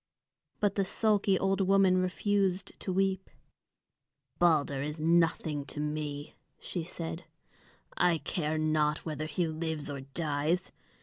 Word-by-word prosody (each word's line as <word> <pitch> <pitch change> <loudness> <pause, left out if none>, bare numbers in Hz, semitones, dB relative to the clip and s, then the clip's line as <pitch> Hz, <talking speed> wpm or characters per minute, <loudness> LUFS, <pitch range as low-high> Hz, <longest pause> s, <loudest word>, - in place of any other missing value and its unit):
But 205 -2 +2
the 200 - +1
sulky 205 -1 +2
old 195 +1 +1
woman 190 -1 +4
refused 190 0 0
to 190 - -3
weep. 190 0 0 1.1
"Balder 150 -5 +3
is 150 +2 -4
nothing 160 -2 +2
to 150 - -8
me," 150 -1 -3 0.3
she 175 - -4
said. 165 0 -5 0.7
"I 175 -2 +4
care 155 +1 -2
not 155 -1 +1
whether 155 -1 -3
he 170 +3 0
lives 160 -2 -3
or 140 -1 -5
dies. 150 +5 -1
165 Hz, 125 wpm, -30 LUFS, 150-190 Hz, 1.1 s, woman